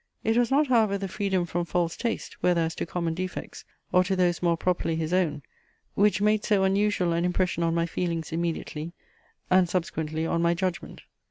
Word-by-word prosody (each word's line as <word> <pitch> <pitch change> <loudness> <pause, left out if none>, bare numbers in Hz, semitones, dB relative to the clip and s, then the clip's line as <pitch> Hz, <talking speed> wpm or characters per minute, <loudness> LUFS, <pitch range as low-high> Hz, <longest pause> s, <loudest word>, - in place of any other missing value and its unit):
It 225 +1 +1
was 240 -1 +3
not 285 +3 +3
however 225 -6 +3
the 195 0 -4
freedom 190 -2 -1
from 175 +1 -2
false 170 0 -1
taste, 230 -2 -4
whether 175 -1 +3
as 165 0 -1
to - - -4
common 170 -1 -2
defects, 185 +2 -6 0.3
or 180 - +5
to 190 +1 0
those 180 -2 +1
more 170 -1 +2
properly 175 -2 0
his 160 +1 -2
own, 155 -6 +1 0.5
which 205 +1 +3
made 210 0 +2
so 200 -3 +2
unusual 190 -2 +2
an 170 +1 0
impression 180 0 0
on 165 0 +1
my 170 0 +1
feelings 170 -1 -3
immediately, 165 -1 -3 0.6
and 185 -1 +5
subsequently 160 -3 -2
on 170 +1 0
my 170 0 +2
judgment. 185 0 -4
180 Hz, 190 wpm, -26 LUFS, 165-195 Hz, 0.6 s, or